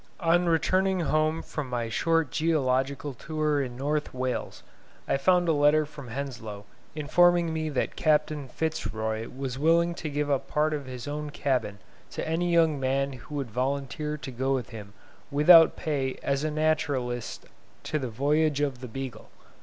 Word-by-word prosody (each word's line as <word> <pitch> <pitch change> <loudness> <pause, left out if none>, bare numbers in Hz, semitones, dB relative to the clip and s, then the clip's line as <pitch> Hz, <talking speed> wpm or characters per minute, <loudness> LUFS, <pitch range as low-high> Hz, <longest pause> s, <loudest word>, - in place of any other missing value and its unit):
On 175 +1 +3
returning 185 +3 +2
home 155 0 +1
from 145 -4 -5
my 120 -2 -2
short 165 +4 +1
geological 140 -3 0
tour 150 +2 -1
in 125 -2 -5
North 150 +3 -1
Wales, 130 0 -3 0.4
I - - +2
found 180 +4 +3
a 165 - +4
letter 150 +1 +4
from 145 -3 -11
Henslow, 115 -5 -6 0.3
informing 170 +2 +3
me 155 -1 -2
that 140 - -2
Captain 150 -2 +1
Fitz 155 -5 -3
Roy 110 +1 -3
was 130 0 -5
willing 170 +3 +3
to 165 -2 -5
give 145 0 -1
up 135 - 0
part 155 +1 +1
of 145 -3 -4
his 125 +1 -7
own 150 +1 -4
cabin 130 -8 -1 0.3
to - - -5
any 170 +2 0
young 165 -4 +3
man 135 +1 0
who 130 +3 -10
would 135 -5 -3
volunteer 140 +4 -2
to 135 -2 -7
go 130 +2 0
with 125 -4 -4
him 105 -3 -9 0.4
without 160 +3 +7
pay 135 -4 -2
as 140 +1 0
naturalist 150 -6 -1 0.4
to 155 - -2
the 130 -3 -3
Voyage 145 +5 +1
of 140 -4 -1
the 130 - -6
"Beagle". 125 -2 -7
145 Hz, 165 wpm, -27 LUFS, 130-155 Hz, 0.4 s, without